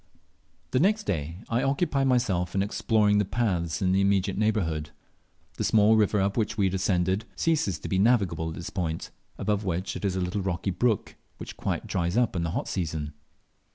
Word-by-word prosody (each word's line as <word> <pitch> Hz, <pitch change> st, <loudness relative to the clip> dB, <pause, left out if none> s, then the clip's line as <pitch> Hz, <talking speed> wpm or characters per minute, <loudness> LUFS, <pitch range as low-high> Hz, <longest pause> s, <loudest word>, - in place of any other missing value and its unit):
The 130 Hz, -, +2 dB
next 210 Hz, +6 st, +2 dB
day 80 Hz, -, -3 dB
I 115 Hz, +2 st, 0 dB
occupied 140 Hz, 0 st, +1 dB
myself 95 Hz, -9 st, +1 dB
in 95 Hz, -, +2 dB
exploring 105 Hz, 0 st, +2 dB
the -, -, +3 dB
paths 95 Hz, -6 st, -1 dB
in 90 Hz, -, +2 dB
the 95 Hz, +1 st, +3 dB
immediate 100 Hz, -1 st, +2 dB
neighbourhood. 90 Hz, -9 st, 0 dB, 0.7 s
The -, -, -1 dB
small 110 Hz, 0 st, +5 dB
river 105 Hz, -1 st, +3 dB
up 100 Hz, +1 st, +1 dB
which 110 Hz, -2 st, -1 dB
we 100 Hz, -, +3 dB
had 95 Hz, -, 0 dB
ascended 95 Hz, +2 st, +1 dB
ceases 155 Hz, -, +1 dB
to -, -, -7 dB
be 95 Hz, -, 0 dB
navigable 95 Hz, -8 st, +2 dB
at 80 Hz, -, -6 dB
this 85 Hz, -, -6 dB
point, 85 Hz, -4 st, -3 dB, 0.3 s
above 105 Hz, -1 st, -1 dB
which 95 Hz, 0 st, -2 dB
it -, -, -6 dB
is 95 Hz, -2 st, 0 dB
a -, -, -1 dB
little 90 Hz, +3 st, -2 dB
rocky 95 Hz, 0 st, -2 dB
brook, 110 Hz, +3 st, 0 dB, 0.2 s
which -, -, -8 dB
quite -, -, -3 dB
dries 85 Hz, +3 st, -1 dB
up 120 Hz, -5 st, +2 dB
in 85 Hz, -, 0 dB
the 85 Hz, -, -1 dB
hot 80 Hz, -, -3 dB
season. 80 Hz, -4 st, -3 dB
95 Hz, 195 wpm, -27 LUFS, 90-110 Hz, 0.7 s, small